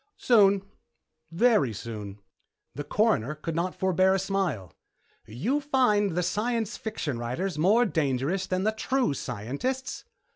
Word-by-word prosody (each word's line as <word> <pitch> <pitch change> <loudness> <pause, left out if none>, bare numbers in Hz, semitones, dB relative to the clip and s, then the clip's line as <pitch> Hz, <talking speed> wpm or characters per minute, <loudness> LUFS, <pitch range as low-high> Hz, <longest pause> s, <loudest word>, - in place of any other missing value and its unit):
"Soon, 200 -5 +4 0.7
very 180 - +3
soon." 105 -2 -7 0.6
The 145 - -5
Coroner 150 - +1
could 155 +1 -5
not 175 +2 -1
forebear 190 0 +2
a - - +2
smile. 185 - -2 0.5
"You 220 - -1
find 245 - +2
the 180 - +1
science 225 +3 -1
fiction 160 - -4
writers 150 +9 -3
more 215 +9 +4
dangerous 160 - -1
than 185 0 -1
the 215 - +2
true 250 - 0
scientists?" 140 - -4
185 Hz, 125 wpm, -27 LUFS, 140-220 Hz, 0.7 s, Soon